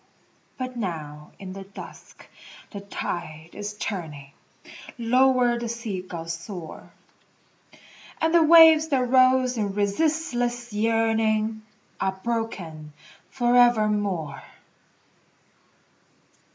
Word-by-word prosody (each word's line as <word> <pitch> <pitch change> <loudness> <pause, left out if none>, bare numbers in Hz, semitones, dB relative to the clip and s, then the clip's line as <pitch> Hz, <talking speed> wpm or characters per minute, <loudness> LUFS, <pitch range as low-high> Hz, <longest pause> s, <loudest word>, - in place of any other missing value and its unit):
But 255 -1 -5
now 155 -8 -6
in 185 -1 -8
the 195 - -8
dusk 195 +1 -13 0.5
the 200 - -7
tide 170 -5 -6
is 205 0 -6
turning, 155 -10 -6 0.7
Lower 250 0 +3
the 235 -1 -4
sea 225 -5 -4
gulls 170 -2 -6
soar, 170 0 -9 1.3
And 320 +1 +1
the 340 - +6
waves 320 -1 +7
that 260 -5 +1
rose 255 0 +4
in 200 -2 -2
resistless 240 +1 -1
yearning 220 0 +1 0.4
Are 190 0 -2
broken 185 -10 -4 0.4
forevermore. 215 - +2
220 Hz, 90 wpm, -24 LUFS, 185-245 Hz, 1.3 s, waves